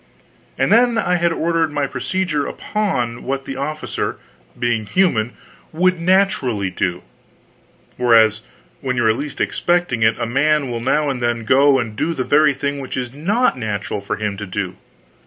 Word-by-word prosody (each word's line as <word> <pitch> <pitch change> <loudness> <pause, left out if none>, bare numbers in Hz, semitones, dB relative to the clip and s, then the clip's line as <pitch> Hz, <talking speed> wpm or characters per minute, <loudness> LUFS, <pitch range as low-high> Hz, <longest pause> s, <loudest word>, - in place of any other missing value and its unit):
And - - +1
then, 240 0 +4
I 180 -5 +1
had 170 0 +1
ordered 165 -1 0
my 145 -1 0
procedure 145 +4 -2
upon 125 - -2
what 135 0 -3
the 135 - -5
officer, 150 +3 -3 0.4
being 120 -3 -1
human, 125 - +1 0.4
would 185 +2 +2
naturally 170 - +1
do; 90 -1 -2 0.9
whereas 110 -3 +4 0.4
when 130 -2 -2
you 120 - +2
are 110 - +5
least 140 +5 -6
expecting 175 -9 0
it, 110 0 +3
a 120 - -2
man 140 +2 +1
will 115 -1 -3
now 145 +4 +1
and 125 -2 -5
then 120 -1 0
go 140 +2 +5
and 115 -4 -3
do 165 +9 -1
the 130 - -1
very 145 +1 +3
thing 140 +1 -2
which 130 -1 -5
it's 125 -1 -4
not 190 - +1
natural 105 -2 -3
for 100 +1 -3
him 105 -1 -3
to 105 0 -6
do. 90 - -3
135 Hz, 170 wpm, -19 LUFS, 115-165 Hz, 0.9 s, are